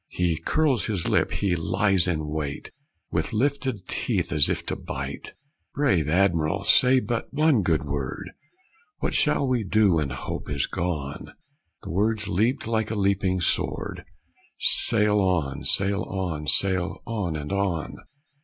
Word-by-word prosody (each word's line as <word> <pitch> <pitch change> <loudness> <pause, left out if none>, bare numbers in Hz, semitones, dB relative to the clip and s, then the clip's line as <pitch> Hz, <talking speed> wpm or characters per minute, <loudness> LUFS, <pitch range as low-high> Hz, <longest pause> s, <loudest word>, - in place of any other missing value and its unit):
He 85 -3 0
curls 145 - +1
his 100 -6 -2
lip, - - +2
he 95 -4 0
lies 95 +3 +1
in 80 -3 -1
wait, 75 -2 -4 0.4
With - - -2
lifted 130 -4 -1
teeth, - - -1
as 75 -3 +4
if - - -2
to - - -2
bite! - - -6 0.4
Brave 95 - +2
Adm'r'l, 85 +1 +1
say 125 +5 +5
but 120 -2 -3
one 150 -5 +3
good 80 -5 0
word: 70 -2 -4 0.7
What - - -2
shall 140 - +2
we 125 -3 +1
do 105 0 +3
when 75 -4 0
hope 65 - -6
is 70 -2 0
gone?" 75 -6 -4 0.5
The - - -6
words 105 +4 0
leapt 110 +9 0
like 110 -1 -1
a 110 - -2
leaping 95 -2 +1
sword: - - -1 0.5
"Sail 105 -2 +3
on! 85 -8 0
sail 100 +1 +2
on! 85 -8 -4
sail 95 +5 +2
on! 105 -8 -3
and 75 +1 -5
on!" 95 -5 -2
95 Hz, 145 wpm, -25 LUFS, 80-110 Hz, 0.7 s, say